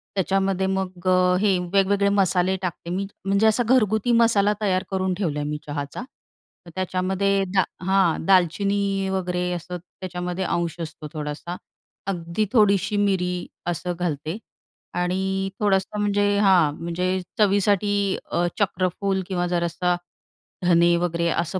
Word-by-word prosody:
त्याच्यामध्ये 190 0 +1
मग 185 -1 -3
अ, 180 0 +4
हे 195 -3 +3 0.2
वेगवेगळे 200 +1 +3
मसाले 190 -1 +2
टाकते 175 -2 -5
मी. 195 +2 -2 0.2
म्हणजे 200 +3 +3
असा 220 +3 +3
घरगुती 220 -2 +3
मसाला 225 -3 +4
तयार 185 -3 +1
करून 190 -1 0
ठेवला 165 -6 -2
आहे 145 - -3
मी 150 - -2
चहाचा. 145 +7 -4 0.6
तर 170 - -12
त्याच्यामध्ये 190 +1 0
दा 190 - +5 0.2
हां. 190 -4 +2
दालचिनी 195 +2 +2
वगैरे 180 -1 -1
असं 175 +1 -5
त्याच्यामध्ये 180 +1 -5
अंश 170 -1 -1
असतो 155 -1 -7
थोडासा. 150 +3 -5 0.5
अगदी 175 +2 -1
थोडीशी 205 -3 +3
मिरी 180 -3 0 0.2
असं 175 +1 -2
घालते 160 +1 -2 0.6
आणि 190 +2 -1
थोडंसं 200 0 +1
म्हणजे 205 0 +2
हां. 180 -7 +4
म्हणजे 180 +2 -1 0.2
चवीसाठी 205 0 +3 0.4
अ, 175 - +1
चक्रफूल 190 0 0
किंवा 180 -2 -1
जरासा 175 0 0 0.7
धने 170 0 +5
वगैरे 170 -1 0
असं 170 +3 -1
185 Hz, 130 wpm, -23 LUFS, 175-200 Hz, 0.7 s, दा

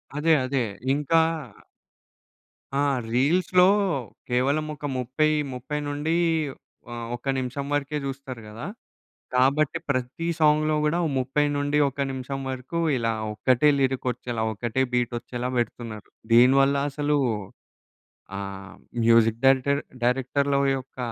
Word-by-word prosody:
అదే. 160 +2 +3
అదే. 130 0 0 0.3
ఇంకా 150 +3 +2 1.6
ఆ! - - +1 0.3
రీల్స్‌లో 180 +7 +4 0.6
కేవలం 135 +5 +1
ఒక 145 0 -8
ముప్పై 130 +5 +1 0.3
ముప్పై 125 +4 -4
నుండి 145 +3 -1 0.8
ఆహ్, 120 -1 -5
ఒక 120 +3 -5
నిమిషం 130 +2 -3
వరకే 145 +1 -1
చూస్తారు 135 -3 -6
గదా! 110 +3 -8 0.7
కాబట్టి 140 +5 +3
ప్రతి 135 +5 -2
సాంగ్‌లో 155 0 +3
కూడా 155 +3 +1 0.2
30 135 +3 +1
నుండి 145 +1 0
ఒక 135 - -19
నిమిషం 135 +1 -5
వరకు, 130 +6 -4 0.2
ఇలా 115 -1 0 0.2
ఒక్కటే 130 +6 +3
లిరిక్ 130 -1 0
వచ్చేలా, 120 -1 -4
ఒకటే 120 +4 -2
బీట్ 125 -1 +1
వచ్చేలా 120 +1 -5
పెడుతున్నారు. 115 -2 -4 0.2
దీనివల్ల 135 +4 +6
అసలు 145 +1 0 1.2
ఆహ్, 100 -1 -7 0.3
మ్యూజిక్ 115 -1 +4
డైరెక్టర్ 135 +2 +4 0.2
డైరెక్టర్‌ల 135 +3 +1 0.2
యొక్క 130 0 -11
135 Hz, 115 wpm, -25 LUFS, 120-145 Hz, 1.6 s, దీనివల్ల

